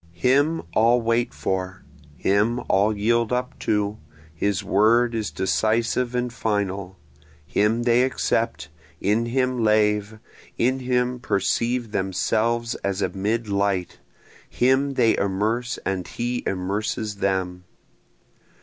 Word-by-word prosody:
Him 140 Hz, -, +2 dB
all 115 Hz, +4 st, +4 dB
wait 115 Hz, +1 st, 0 dB
for, 95 Hz, 0 st, -3 dB, 0.3 s
him 105 Hz, +6 st, +1 dB
all 105 Hz, +2 st, +2 dB
yield 115 Hz, +2 st, +1 dB
up 125 Hz, 0 st, -2 dB
to, 105 Hz, 0 st, -1 dB, 0.3 s
his 95 Hz, +3 st, -1 dB
word 115 Hz, +4 st, +3 dB
is 110 Hz, -2 st, -2 dB
decisive 115 Hz, +5 st, 0 dB
and 125 Hz, -1 st, -1 dB
final, 100 Hz, -4 st, -2 dB, 0.5 s
Him 110 Hz, +7 st, +1 dB
they 120 Hz, 0 st, +4 dB
accept, 115 Hz, -3 st, -1 dB, 0.3 s
in 110 Hz, +4 st, +1 dB
him 125 Hz, -1 st, 0 dB
lave, 105 Hz, 0 st, +2 dB, 0.4 s
in 130 Hz, +3 st, +1 dB
him 125 Hz, -1 st, 0 dB
perceive 120 Hz, +1 st, 0 dB
themselves 115 Hz, +5 st, 0 dB
as 100 Hz, 0 st, -1 dB
amid 105 Hz, +5 st, -1 dB
light, 100 Hz, -2 st, -1 dB, 0.5 s
Him 135 Hz, +2 st, +2 dB
they 115 Hz, -3 st, +4 dB
immerse 110 Hz, +5 st, -1 dB
and 95 Hz, -2 st, -2 dB
he 120 Hz, +1 st, -3 dB
immerses 105 Hz, +3 st, -2 dB
them. 95 Hz, -2 st, -2 dB
110 Hz, 115 wpm, -23 LUFS, 100-120 Hz, 0.5 s, all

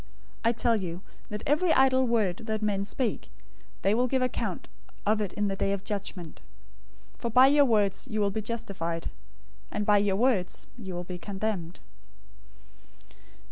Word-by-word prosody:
012:036 -, -, -29 dB
I 230 Hz, -, +5 dB
tell 235 Hz, 0 st, +2 dB
you 180 Hz, -3 st, -4 dB, 0.3 s
that 210 Hz, 0 st, -5 dB
every 310 Hz, +5 st, +3 dB
idle 260 Hz, -1 st, +4 dB
word 215 Hz, -7 st, +1 dB
that 220 Hz, -1 st, -1 dB
men 200 Hz, -2 st, +1 dB
speak, 200 Hz, -, -2 dB, 0.5 s
they 195 Hz, -, +4 dB
will 245 Hz, +3 st, +2 dB
give 260 Hz, 0 st, +1 dB
account 230 Hz, -6 st, -2 dB, 0.4 s
of 215 Hz, +1 st, +2 dB
it 200 Hz, -3 st, -2 dB
in 205 Hz, 0 st, 0 dB
the 195 Hz, -, -1 dB
day 195 Hz, 0 st, 0 dB
of 195 Hz, -1 st, -4 dB
judgment. 185 Hz, -5 st, -5 dB, 0.8 s
012:037 -, -, -29 dB
For 235 Hz, -, -1 dB
by 250 Hz, +3 st, +7 dB
your 285 Hz, +1 st, +6 dB
words 210 Hz, -6 st, +1 dB
you 215 Hz, -, -2 dB
will 200 Hz, -1 st, +2 dB
be 220 Hz, +2 st, -2 dB
justified, 195 Hz, -7 st, -3 dB, 0.6 s
and 210 Hz, -, -2 dB
by 205 Hz, 0 st, +5 dB
your 200 Hz, -1 st, +2 dB
words 215 Hz, -5 st, +1 dB
you 190 Hz, -7 st, -7 dB
will 175 Hz, -, -3 dB
be 180 Hz, 0 st, -7 dB
condemned." 190 Hz, -, -4 dB
210 Hz, 175 wpm, -28 LUFS, 190-235 Hz, 0.8 s, by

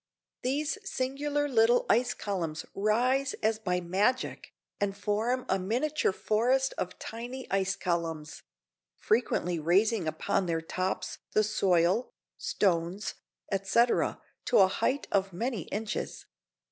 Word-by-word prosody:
These 290 Hz, +9 st, -1 dB
singular 290 Hz, -1 st, -1 dB
little 240 Hz, -2 st, +4 dB
ice 245 Hz, +1 st, +3 dB
columns 170 Hz, -6 st, -3 dB
rise 250 Hz, +7 st, +1 dB
as 220 Hz, 0 st, +2 dB
by 180 Hz, -4 st, -1 dB
magic, 200 Hz, +9 st, 0 dB, 0.3 s
and 200 Hz, -1 st, -1 dB
form 220 Hz, +5 st, 0 dB
a 190 Hz, -, +1 dB
miniature 245 Hz, +9 st, 0 dB
forest 245 Hz, +7 st, +1 dB
of 180 Hz, -, -4 dB
tiny 245 Hz, +3 st, -6 dB
ice 195 Hz, 0 st, +1 dB
columns; 165 Hz, -4 st, -3 dB, 0.5 s
frequently 180 Hz, -6 st, +1 dB
raising 185 Hz, +4 st, +2 dB
upon 160 Hz, +4 st, 0 dB
their 165 Hz, -1 st, 0 dB
tops 185 Hz, +3 st, -3 dB
the 215 Hz, -, +4 dB
soil, 195 Hz, 0 st, +2 dB, 0.3 s
stones, 180 Hz, +1 st, 0 dB, 0.4 s
etc., 200 Hz, +5 st, +2 dB, 0.3 s
to -, -, +3 dB
a 190 Hz, -, +7 dB
height 260 Hz, +8 st, -1 dB
of 195 Hz, -2 st, +1 dB
many 225 Hz, -, -2 dB
inches. 215 Hz, +1 st, -4 dB
210 Hz, 120 wpm, -29 LUFS, 185-245 Hz, 0.5 s, a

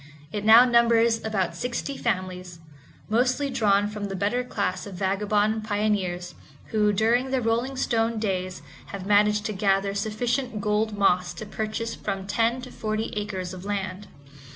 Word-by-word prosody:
It 205 Hz, -, -3 dB
now 225 Hz, +3 st, +8 dB
numbers 235 Hz, -1 st, +3 dB
about 190 Hz, -6 st, -1 dB
sixty 245 Hz, +7 st, -3 dB
families, 185 Hz, -5 st, -3 dB, 0.5 s
mostly 250 Hz, +5 st, +1 dB
drawn 205 Hz, -3 st, +2 dB
from 210 Hz, -1 st, -5 dB
the 195 Hz, -1 st, -4 dB
better 205 Hz, +6 st, 0 dB
class 200 Hz, -6 st, -3 dB
of 195 Hz, -, -8 dB
vagabond 210 Hz, +3 st, 0 dB
pioneers, 200 Hz, -5 st, -1 dB, 0.4 s
who, 210 Hz, -1 st, +3 dB
during 230 Hz, +6 st, +2 dB
their 260 Hz, 0 st, +1 dB
rolling 240 Hz, +3 st, -1 dB
stone 230 Hz, -2 st, 0 dB
days 185 Hz, -3 st, -2 dB, 0.2 s
have 195 Hz, -2 st, -7 dB
managed 210 Hz, +1 st, +3 dB
to 215 Hz, -, -2 dB
gather 195 Hz, 0 st, +1 dB
sufficient 225 Hz, +3 st, -2 dB
gold 210 Hz, +1 st, 0 dB
moss 180 Hz, -2 st, +2 dB
to 215 Hz, -, -7 dB
purchase 220 Hz, +2 st, -3 dB
from 195 Hz, -2 st, -4 dB
ten 230 Hz, +5 st, 0 dB
to 255 Hz, -, -9 dB
forty 215 Hz, 0 st, -3 dB
acres 190 Hz, -3 st, -4 dB
of 185 Hz, -1 st, -8 dB
land. 200 Hz, -1 st, -4 dB
210 Hz, 155 wpm, -25 LUFS, 195-230 Hz, 0.5 s, now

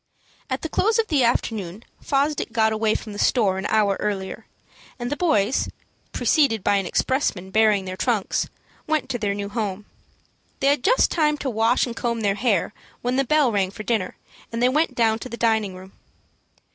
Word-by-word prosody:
At 260 Hz, 0 st, -3 dB
the -, -, -1 dB
close 435 Hz, +8 st, +1 dB
of 450 Hz, -1 st, 0 dB
the 285 Hz, -5 st, +3 dB
afternoon 220 Hz, -4 st, -1 dB, 0.2 s
Fosdick 285 Hz, -2 st, 0 dB
got 220 Hz, -1 st, +2 dB
away 215 Hz, 0 st, +1 dB
from 215 Hz, -, -5 dB
the 205 Hz, -, -7 dB
store 200 Hz, -6 st, +2 dB
an 195 Hz, -, -2 dB
hour 205 Hz, -3 st, +2 dB
earlier, 195 Hz, -2 st, -4 dB, 0.5 s
and 240 Hz, 0 st, -4 dB
the -, -, 0 dB
boys, 260 Hz, -, +1 dB, 0.4 s
preceded 265 Hz, -, +2 dB
by 205 Hz, -, +3 dB
an 195 Hz, -2 st, -1 dB
expressman 190 Hz, -6 st, -1 dB
bearing 215 Hz, -3 st, +3 dB
their 185 Hz, 0 st, -5 dB
trunks, 220 Hz, -1 st, 0 dB, 0.4 s
went 310 Hz, -1 st, 0 dB
to 245 Hz, -, -2 dB
their 205 Hz, -2 st, -1 dB
new 200 Hz, 0 st, -4 dB
home. 205 Hz, -2 st, -3 dB, 0.7 s
They 275 Hz, -, +3 dB
had 285 Hz, -3 st, +1 dB
just -, -, +3 dB
time 300 Hz, -3 st, +2 dB
to 270 Hz, -2 st, -3 dB
wash 225 Hz, +3 st, +2 dB
and 240 Hz, -2 st, -6 dB
comb 235 Hz, -2 st, -2 dB
their 200 Hz, -2 st, +2 dB
hair, 205 Hz, -2 st, 0 dB, 0.3 s
when 245 Hz, +1 st, 0 dB
the 275 Hz, -, +3 dB
bell 290 Hz, -1 st, +3 dB
rang 195 Hz, -3 st, +1 dB
for 215 Hz, +3 st, -8 dB
dinner, 215 Hz, -5 st, -1 dB, 0.3 s
and 230 Hz, -, -3 dB
they 250 Hz, +1 st, +4 dB
went 295 Hz, -1 st, +1 dB
down 225 Hz, -2 st, +2 dB
to 255 Hz, -, -7 dB
the 235 Hz, -, -6 dB
dining 220 Hz, -5 st, +1 dB
room. 185 Hz, +1 st, -12 dB
225 Hz, 195 wpm, -23 LUFS, 205-260 Hz, 0.7 s, they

